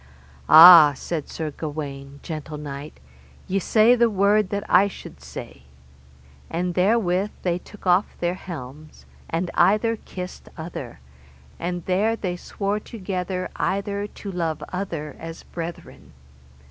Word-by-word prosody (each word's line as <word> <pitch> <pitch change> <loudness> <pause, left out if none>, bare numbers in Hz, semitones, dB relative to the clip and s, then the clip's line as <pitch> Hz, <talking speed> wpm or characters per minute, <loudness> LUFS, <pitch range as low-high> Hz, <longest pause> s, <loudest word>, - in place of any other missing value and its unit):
Ah, 160 -2 +10
said 155 +1 -5
Sir 155 -2 -4
Gawaine, 140 -2 -7
gentle 155 -2 -6
knight, 145 0 -8 0.5
ye 195 +1 0
say 220 +5 +4
the 235 -1 +3
word 205 0 +2
that 200 0 -2
I 200 - +5
should 200 - -11
say. 70 0 -9 0.9
And 175 +1 -2
therewith 190 0 +2
they 175 -1 0
took 210 +2 -16
off 180 +2 +2
their 175 0 0
helms, 155 -4 -10 0.2
and 170 +2 -2
either 225 +3 +3
kissed 180 -3 -9
other, 160 - -7 0.6
and 175 0 -4
there 205 +5 +1
they 185 -5 -3
swore 200 +3 -3
together 185 -4 -4
either 200 +1 -1
to 205 -1 -8
love 165 -3 -2
other 165 -6 -4
as 165 0 -8
brethren. 170 0 -8
180 Hz, 130 wpm, -23 LUFS, 160-200 Hz, 0.9 s, Ah